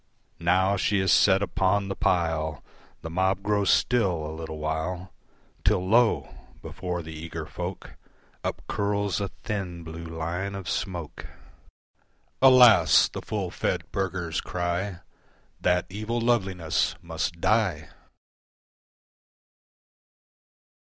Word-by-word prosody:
Now 95 +3 +2
she 100 +1 +1
is 95 0 +2
set 95 0 +5
upon 100 0 +1
the 95 - -3
pile, 80 -5 0 0.4
The 80 - -5
mob 95 +2 +1
grows 105 -1 +1
still 95 -11 +2
a 80 - -5
little 80 -1 -6
while, 80 +4 -3 0.5
Till 95 -2 +2
lo! 115 +2 +3 0.4
before 90 -2 -4
the 80 0 -8
eager 80 0 -6
folk 90 +4 -7 0.5
Up - - -3
curls 100 -2 -1
a 100 - -1 0.2
thin, 95 -6 -4
blue 80 +1 -8
line 85 +4 -4
of 95 -3 -7
smoke. 90 -4 -4 1.1
"Alas!" 125 -10 +7
the - - -6
full - - -3
fed - - -2
burghers 90 -4 -2
cry, 90 +1 -3 0.6
"That 90 0 +2
evil 110 +5 -3
loveliness 95 -9 0
must 85 0 -3
die!" 110 -1 +1
90 Hz, 110 wpm, -26 LUFS, 85-100 Hz, 1.1 s, Alas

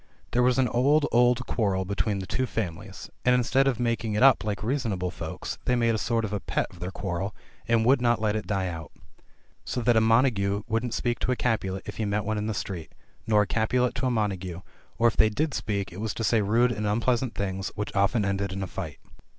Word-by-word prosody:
There 125 - +2
was 125 0 +3
an 130 -1 +3
old, 140 +6 +3
old 125 +1 +3
quarrel 95 -4 0
between 100 +1 -1
the 95 - -4
two 130 +6 -1
families, 100 -2 -5
and 125 0 +4
instead 130 +2 +2
of 125 -4 0
making 115 -2 -1
it 105 - +2
up 135 -4 +6
like 105 -1 -3
reasonable 110 -8 -1
folks, - - -6
they 125 - +2
made 115 -1 +2
a 110 - -1
sort 115 -1 0
of 105 - -5
a 105 - -1
pet - - -1
of 90 - -15
their 90 +1 -4
quarrel, 95 0 -4 0.3
and 115 -1 +3
would 130 +1 +4
not 120 -2 +2
let 105 -1 0
it 110 - -3
die 95 -2 0
out. 80 -3 -6 0.7
So - - -3
that 120 0 +3
a 110 - +5
Montagu 110 -4 +2
wouldn't 115 +1 -1
speak 120 -1 -1
to - - 0
a - - +2
Capulet 95 -6 -1
if - - -7
he 110 - -1
met 105 0 -1
one 110 0 -1
in 105 - -2
the 110 - -2
street 90 -4 -5 0.2
— - - -35
nor 105 -2 +4
a - - -3
Capulet 120 +5 +1
to 130 - -1
a - - +2
Montagu 95 -6 -2 0.2
— - - -32
or 120 - +4
if 115 - +1
they 110 - +5
did 145 +7 -1
speak, 100 -6 -2
it 95 - -7
was 110 -1 -2
to 115 - -3
say 110 0 +3
rude 115 +5 +3
and 105 -3 -2
unpleasant 120 +3 0
things, 95 -1 -3
which 105 0 -4
often 100 +2 +2
ended 100 0 -1
in 95 +1 -3
a - - -3
fight. - - -6
110 Hz, 245 wpm, -27 LUFS, 100-120 Hz, 0.7 s, up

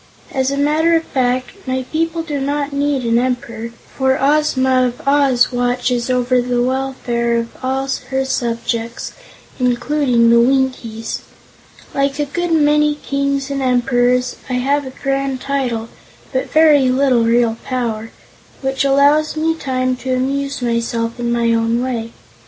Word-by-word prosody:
"As 265 -1 0
a 280 - -2
matter 310 +4 +2
of 325 - +1
fact, 255 -3 -1 0.2
my 260 0 -1
people 330 +1 -1
do 295 -4 -3
not 285 +1 -2
need 280 -2 0
an 230 0 +3
Emperor, 240 -2 -3 0.3
for 265 0 +2
Ozma 265 -3 +2
of 245 +3 -8
Oz 275 -4 +3
watches 245 0 0
over 250 0 +2
the 245 0 -1
welfare 250 -2 -1
of 230 0 -4
all 265 +1 -1 0.2
her 265 0 0
subjects, 235 -2 -3 0.5
including 250 -1 +2
the 235 - +6
Winkies. 245 -3 0 0.7
Like 275 0 0
a 295 - 0
good 345 +4 -3
many 300 -1 +3
kings 280 -1 -2
and 275 -1 -2
emperors, 250 0 +1
I - - -2
have 275 +3 0
a 260 - -12
grand 275 -1 -1
title, 250 -5 -2 0.5
but 260 - -1
very 300 -4 +5
little 255 -2 +3
real 230 0 +2
power, 230 -4 -3 0.5
which 270 +1 0
allows 285 +3 +3
me 320 +1 +1
time 255 -4 -1
to 255 0 -2
amuse 275 +1 -2
myself 230 0 -1
in 240 0 -1
my 235 -1 +2
own 230 +1 +1
way. 240 -3 -3
260 Hz, 145 wpm, -18 LUFS, 240-280 Hz, 0.7 s, the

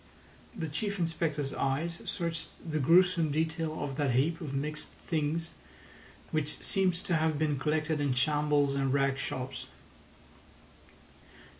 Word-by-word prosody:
The 165 -6 -3
Chief 200 +7 -2
Inspector's 160 -4 -1
eyes 155 +5 -1
searched 165 -1 -2 0.2
the 155 -1 0
gruesome 170 +2 +5
detail 160 +1 -1
of 140 -1 -4
that 140 -5 +1
heap 160 +6 +2
of 150 -5 -4
mixed 150 +2 -2
things, 160 +1 -2 0.8
which 150 -2 0
seemed 190 -2 +2
to 175 0 -1
have 160 -1 +2
been 150 -2 +1
collected 155 +1 0
in 140 -3 +1
shambles 145 +1 +2
and 135 -1 +1
rag 135 0 +2
shops. 130 -1 -4
155 Hz, 130 wpm, -31 LUFS, 140-165 Hz, 0.8 s, gruesome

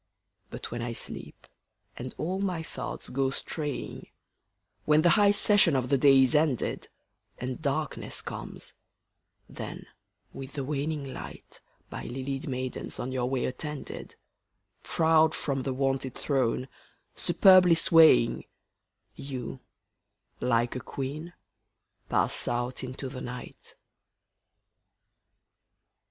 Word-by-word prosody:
But - - -7
when 120 0 -4
I 120 0 -3
sleep, - - -7 0.5
and 125 +1 -7
all 185 +4 -2
my 180 -4 -1
thoughts - - -6
go 135 +1 0
straying, 145 +1 -5 0.8
When 155 +1 +4
the 175 - +6
high 205 -2 +5
session 205 -5 +5
of 125 -1 0
the 140 - +4
day 135 -1 +7
is 130 - +2
ended, 150 -5 +1 0.5
And 130 +2 -5
darkness 150 +1 -2
comes; - - -8 0.7
then, - - -7 0.5
with 135 0 -8
the 140 -2 -3
waning 145 0 -3
light, - - -10 0.3
By - - -6
lilied 135 +3 -4
maidens 130 -1 -4
on 130 - -3
your 125 -1 -1
way 130 -1 0
attended, 150 +3 -6 0.7
Proud 160 -1 +3
from 135 -2 -2
the 135 - -2
wonted 135 -1 -1
throne, 130 -2 0 0.5
superbly 185 -3 +6
swaying, 160 -7 +5 0.7
You, 130 -2 -6 0.8
like 120 -1 +1
a - - -2
queen, 145 +6 -6 0.8
pass - - +3
out 120 +2 -2
into 130 +1 -5
the 130 -1 -7
night. 125 0 -8
135 Hz, 115 wpm, -28 LUFS, 130-155 Hz, 0.8 s, day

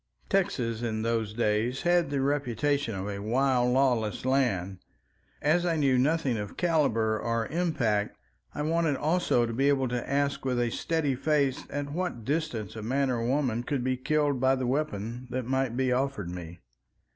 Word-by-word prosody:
Texas 120 - 0
in 110 -2 -2
those 115 -2 0
days 115 +3 0
had 175 -3 +3
the 140 -1 -1
reputation 140 -2 0
of 95 +1 -4
a 100 -1 -4
wild 125 +2 +2
lawless 125 -5 +1
land. 100 -9 +1 0.6
As 160 +4 +3
I 170 -2 +1
knew 135 -4 +3
nothing 140 -3 +1
of 105 -1 -6
caliber 115 -11 +2
or 115 0 -1
impact, 125 -11 0 0.4
I 150 - -2
wanted 160 -1 +1
also 155 -5 +2
to 115 - -4
be 135 +4 +2
able 135 -2 +2
to 120 0 -3
ask 140 +1 0
with 125 -2 0
a 120 -1 +1
steady 160 -1 0
face 140 0 0
at 145 0 -4
what 165 -10 -3
distance 125 -8 -2
a 110 - -5
man 130 +4 0
or 115 -2 -1
woman 125 -2 0
could 130 0 -2
be 130 0 +1
killed 145 +1 0
by 130 +1 +3
the 130 -1 -2
weapon 120 -3 -2
that 130 0 -3
might 130 -1 -1
be 130 -1 +1
offered 125 -8 -1
me. 85 -1 -8
130 Hz, 175 wpm, -28 LUFS, 115-145 Hz, 0.6 s, had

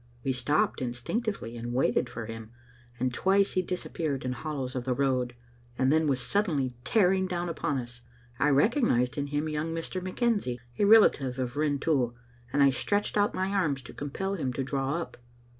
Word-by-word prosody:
We 135 - 0
stopped 130 +4 +1
instinctively, 125 - -3
and 120 +1 -5
waited 125 -1 +2
for 115 - -6
him, 115 -1 -8 0.5
and 125 0 0
twice 195 +6 +3
he 185 - +1
disappeared 165 -6 -3
in 125 - -1
hollows 135 -1 -4
of 125 - -3
the 125 0 0
road, 130 -3 0 0.4
and 130 +2 +3
then 160 0 +3
was 135 -3 +1
suddenly 145 -6 0
tearing 190 - +3
down 175 -1 -2
upon 155 -3 -1
us. 120 -1 -6 0.4
I 150 - +4
recognised 140 - +3
in 145 - -1
him 145 +2 -1
young 155 +2 -2
Mr. 165 +3 -4
McKenzie, 185 - 0 0.2
a 205 - +4
relative 155 - +5
of 125 0 -3
Rintoul, 145 -4 +1 0.4
and 140 +1 +4
I 140 - +6
stretched 205 +10 0
out 205 0 +2
my 190 +1 0
arms 155 -9 0
to - - -10
compel 190 +8 -3
him 145 -9 -2
to 135 - -2
draw 135 +1 -1
up. 170 - -7
145 Hz, 180 wpm, -28 LUFS, 125-185 Hz, 0.5 s, I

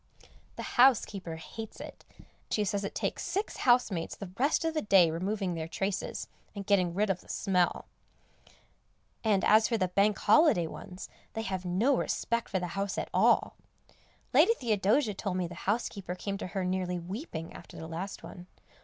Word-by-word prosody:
The - - -6
housekeeper 205 -9 +3
hates 220 +7 -8
it; - - -10 0.4
she 210 - +1
says 200 0 -1
it 200 - -5
takes - - -2
six 400 +3 -2
housemaids 240 - +2
the 195 -3 -8
rest 290 +5 +2
of 325 - 0
the 310 - 0
day 190 -5 +5
removing 190 +2 -2
their 160 -1 -4
traces, 195 +3 -3 0.3
and 200 -1 -5
getting 185 -4 +2
rid 205 0 +2
of 180 - -3
the - - -21
smell. 180 -2 +1 1.4
And 205 -4 +2
as 215 +1 +6
for 230 - 0
the 185 -3 0
Bank 200 +3 +2
Holiday 300 - +5
ones, 180 +3 -8 0.3
they 225 - -3
have 190 -3 -3
no 210 +11 +2
respect 235 -1 -1
for 190 - 0
the 180 -1 -3
house 195 0 -2
at - - -3
all. - - +3 0.8
Lady 460 - +6
Theodosia 220 - +1
told 190 -1 -3
me 180 - 0
the 170 - -7 0.2
housekeeper 200 -4 -2
came 200 +1 -4
to - - -4
her 190 0 -3
nearly 180 -1 -1
weeping 175 - -6
after - - -12
the 160 - -7
last 165 +4 -6
one. 175 +1 -10
195 Hz, 175 wpm, -30 LUFS, 180-220 Hz, 1.4 s, as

